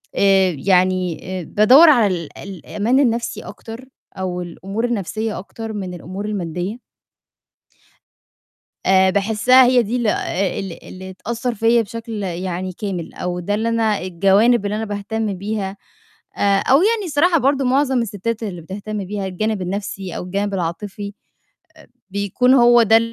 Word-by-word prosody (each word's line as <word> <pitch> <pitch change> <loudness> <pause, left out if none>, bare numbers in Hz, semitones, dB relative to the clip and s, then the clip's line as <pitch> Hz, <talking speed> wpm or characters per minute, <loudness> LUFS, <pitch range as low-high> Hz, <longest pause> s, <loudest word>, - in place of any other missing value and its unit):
آآ، 195 -2 +4
يعني 185 -2 +2 0.2
آآ، - - -7
بادوّر 255 - +6
على 235 -8 +5
ال 170 -5 -4
الأمان 205 - -2
النَفْسي 235 -3 0
أكتر 230 +3 -10 0.3
أو 180 -1 -3
الأمور 195 +6 -4
النَفْسية 220 -1 -3
أكتر 225 +3 -7
من 190 -3 -5
الأمور 185 +4 -7
المادّية. 190 +2 -4 2.1
آآ، 190 0 +5
باحسّها 220 +6 +4
هي 245 -1 +4
دي 230 +4 -2
ال 240 -2 -1
آآ، 195 -2 -1
ال 190 -4 -7
اللي 190 0 -9
تأثّر 235 +5 -3
فيّا 230 +2 +3
بشكل 225 0 -6
يعني 185 0 -4
كامل، 180 -3 -5
أو 180 0 -3
ده 205 +4 -2
اللي 225 +2 0
أنا 225 -3 +1
الجوانب 195 +5 +3
اللي 210 +1 -2
أنا 220 - -2
باهتم 205 0 -3
بيها. 200 0 -4 0.6
آآ، 200 -1 +3
أو 265 - +4
يعني 435 -1 +2
الصراحة 330 +2 +3
برضو 275 0 +1
معظم 260 -1 +2
السِتّات 225 +1 -4
اللي 185 -5 -5
بتهتم 205 +3 -5
بيها 200 0 -4
الجانب 200 +2 -2
النَفْسي 190 -1 -4
أو - - -4
الجانب 200 +2 -2
العاطفي، 190 +4 -4
آآ، 200 - -16 0.6
بيكون 200 +6 +2
هو 240 -1 +6
ده 225 +1 +6
205 Hz, 150 wpm, -20 LUFS, 190-230 Hz, 2.1 s, بادوّر